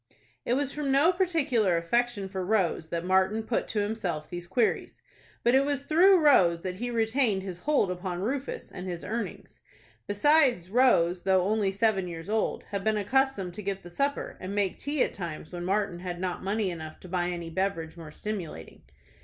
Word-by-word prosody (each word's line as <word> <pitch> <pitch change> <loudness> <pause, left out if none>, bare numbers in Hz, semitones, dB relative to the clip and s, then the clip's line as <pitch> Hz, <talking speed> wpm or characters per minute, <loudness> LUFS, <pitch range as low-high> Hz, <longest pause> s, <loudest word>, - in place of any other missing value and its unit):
It 245 - +2
was 280 0 -1
from 290 -2 -2
no 285 +6 +5
particular 280 - +2
affection 215 +4 0
for 190 -1 -4
Rose 180 -5 0
that 170 0 -3
Martin 190 +4 +2
put 225 +1 -1
to 210 - -1
himself 190 -8 -3
these 175 0 -6
queries. 220 +5 0 0.4
But 240 - +4
it 265 +1 +5
was 280 -1 -1
through 365 +6 +6
Rose 170 - +5
that 185 -1 -4
he 245 +4 -3
retained 225 -3 +1
his 185 -3 -6
hold 285 -9 +1
upon 180 -1 -4
Rufus 270 +5 -3
and 180 +1 -7
his 175 -2 -5
earnings. 230 +1 -5 0.5
Besides, 240 - +3
Rose, 185 -8 +4
though 190 -1 +3
only 205 0 +1
seven 195 -2 +1
years 165 +1 -7
old, 220 0 0
had 200 -1 -2
been 220 0 +1
accustomed 210 -3 +1
to 210 - -7
get 195 -1 -4
the 175 - -11
supper, 280 +9 -2
and 190 +2 -5
make 200 -3 0
tea 285 -1 +1
at - - -2
times 170 -3 -6
when 175 0 -4
Martin 195 -2 0
had 175 -1 -5
not 185 -1 -3
money 200 0 0
enough 155 -2 -8
to - - -11
buy 175 -1 -1
any 170 -2 -5
beverage 165 -3 -2
more 165 -2 -9
stimulating. 170 - -6
195 Hz, 190 wpm, -28 LUFS, 175-240 Hz, 0.5 s, through